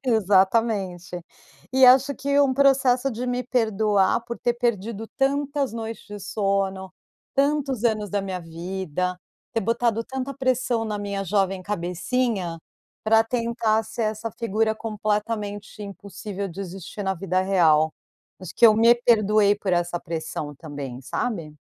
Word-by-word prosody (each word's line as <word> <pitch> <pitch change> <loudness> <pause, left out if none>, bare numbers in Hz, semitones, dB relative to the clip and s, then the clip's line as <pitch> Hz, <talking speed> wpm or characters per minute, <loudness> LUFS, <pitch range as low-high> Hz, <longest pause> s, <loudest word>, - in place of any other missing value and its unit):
Exatamente. 195 -4 +1 0.5
E 265 0 +6
acho 265 +2 +6
que 280 +2 0
um 275 -2 +4
processo 270 -1 +3
de 245 +2 -4
me 250 0 -1
perdoar, 220 -5 +2
por 235 0 -6
ter 240 -1 0
perdido 225 -2 -2
tantas 280 -1 0
noites 225 -1 -6
de 205 -1 -8
sono, 195 -2 -1 0.4
tantos 275 -4 +1
anos 215 -3 +1
da 205 -1 0
minha 185 -2 -4
vida, 180 +1 -4 0.4
ter 225 - 0
botado 230 +1 0
tanta 265 +1 -5
pressão 255 -3 0
na 210 -1 -3
minha 200 -1 -3
jovem 195 0 0
cabecinha, 180 0 -2 0.4
pra 225 +1 +5
tentar 230 -2 0
ser 220 +1 -4
essa 215 +1 -2
figura 220 -1 +1
completamente 210 -1 -3
impossível 200 0 -6
de 180 +3 -8
existir, 195 +2 -7
na 190 0 0
vida 185 +1 -1
real. 160 -5 +3 0.5
Acho 180 -3 -8
que 235 - +7
eu 215 - +6
me 230 +2 +6
perdoei 215 -3 +3
por 200 -2 -3
essa 175 0 0
pressão, 160 -2 -5
também, 140 -5 -7
sabe. 165 - -3
210 Hz, 140 wpm, -24 LUFS, 190-235 Hz, 0.5 s, que